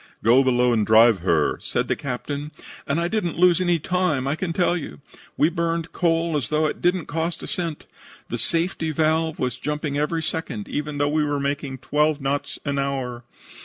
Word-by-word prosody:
"'Go 120 +5 +6
below 125 -1 +3
and 110 -2 +2
drive 110 0 +6
her,' 85 -4 +1
said - - -1
the - - +1
captain, 140 +2 -4 0.4
and 140 +4 +1
I 170 - 0
didn't 180 -5 -2
lose 180 0 +5
any 175 -2 +2
time, 170 -5 0
I 140 - +1
can 175 +1 -3
tell 175 +1 +2
you. 165 -3 -6 0.4
We 150 - +4
burned 170 -1 -2
coal 165 -2 +1
as 145 - -1
though 155 0 +2
it 155 - -2
didn't 180 -1 +1
cost 165 +2 -3
a - - -6
cent. 165 -4 -4 0.4
The 120 - -3
safety 165 - 0
valve 160 +1 +1
was 125 -1 -2
jumping 150 +1 -2
every 160 +2 -1
second, 135 -11 -3
even 150 0 -3
though 145 0 +2
we 150 +1 +1
were 145 -1 -1
making 140 -1 -2
twelve 150 +3 +1
knots 140 +1 -2
an 140 -1 -1
hour. 130 -3 -3
150 Hz, 195 wpm, -23 LUFS, 135-165 Hz, 0.4 s, Go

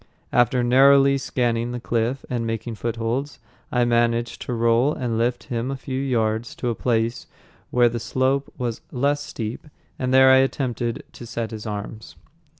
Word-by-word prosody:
After 120 +1 +3
narrowly 135 +2 +5
scanning 120 -2 -1
the 125 - -3
cliff 120 +3 -1
and 120 -2 -2
making 115 +1 -3
footholds, 115 +5 -3 0.3
I 125 -1 +2
managed 120 0 +1
to 125 - -4
roll 115 +5 +2
and 120 -3 -2
lift 120 +2 0
him 120 +1 -3
a 135 - -2
few 130 0 -4
yards 115 -3 -1
to 125 - -2
a - - 0
place 115 0 -1 0.4
where 120 -1 +4
the 120 0 -2
slope 130 +4 0
was 120 -3 -3
less 140 +3 0
steep, 115 0 -6 0.3
and 130 0 -1
there 130 0 +7
I 130 - +7
attempted 125 -3 -1
to 120 - -10
set 115 0 -4
his 110 -1 -7
arms. 105 +1 -6
120 Hz, 165 wpm, -23 LUFS, 115-130 Hz, 0.4 s, there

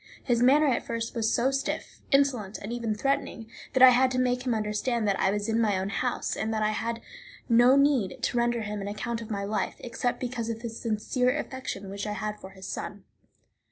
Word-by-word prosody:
His 240 -3 +1
manner 280 +5 +5
at 260 -5 +1
first 230 0 -3
was 225 -1 +1
so 255 +3 +2
stiff, 275 0 -3
insolent, 260 -8 +2
and 210 +4 -6
even 230 -3 -2
threatening, 255 -1 -1 0.3
that 260 - +5
I 260 - +11
had 255 +1 +4
to 255 - -2
make 250 0 0
him 240 - +2
understand 215 +2 -1
that 195 -1 +1
I 190 - +3
was 205 +1 -1
in 225 +1 +1
my 210 -4 +2
own 190 +1 -2
house, 245 +4 -1
and 220 - -2
that 215 - 0
I 215 - +2
had 230 +2 -3 0.5
no 245 +2 +6
need 275 -9 +2
to - - 0
render 240 0 +1
him 210 -1 -4
an 195 - -4
account 230 +3 -3
of 225 - -8
my 200 -2 -2
life, 205 0 -2
except 245 0 -3
because 240 -2 -3
of 230 +1 -5
the 235 - -4
sincere 245 +4 0
affection 260 -9 -5
which 200 +1 -4
I 210 - -2
had 210 +1 -4
for 190 - -10
his 190 0 -12
son. 205 -1 -6
230 Hz, 225 wpm, -27 LUFS, 210-250 Hz, 0.5 s, I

